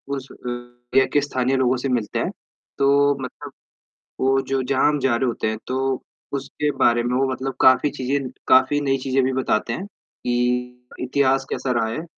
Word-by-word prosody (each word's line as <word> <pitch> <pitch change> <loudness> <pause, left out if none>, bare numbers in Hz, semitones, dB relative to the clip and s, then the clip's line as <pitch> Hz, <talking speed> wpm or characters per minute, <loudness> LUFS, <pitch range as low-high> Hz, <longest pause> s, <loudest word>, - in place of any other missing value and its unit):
उस 135 -1 -7
अ, - - -12
एरिया 120 +1 -1
के 145 - +4
स्थानीय 130 -2 0
लोगों 130 0 +2
से - - +1
मिलते 120 -4 -1
हैं - - -1 0.5
तो 140 +1 +4
मतलब 130 - -8 0.7
वो 135 +1 +3
जो 135 -1 +2
जहाँ 130 +2 +2
हम 150 0 +1
जा 130 -3 +2
रहे 130 +2 0
होते 115 -2 -1
हैं 110 0 -2
तो 130 0 -1 0.4
उसके 145 +2 -2
बारे 120 0 +4
में 120 +1 -1
वो 135 0 +2
मतलब 130 +1 -4
काफ़ी 130 +3 +5
चीज़ें 135 0 -2 0.2
काफ़ी 130 +3 +5
नई 135 -1 +1
चीज़ें 135 0 +1
भी 130 - 0
बताते 125 -3 0
हैं 185 - -4
कि 125 -7 -3
इतिहास 135 +1 +2
कैसा 130 - -2
रहा 110 - 0
है 155 +9 -4
130 Hz, 185 wpm, -22 LUFS, 125-135 Hz, 0.7 s, काफ़ी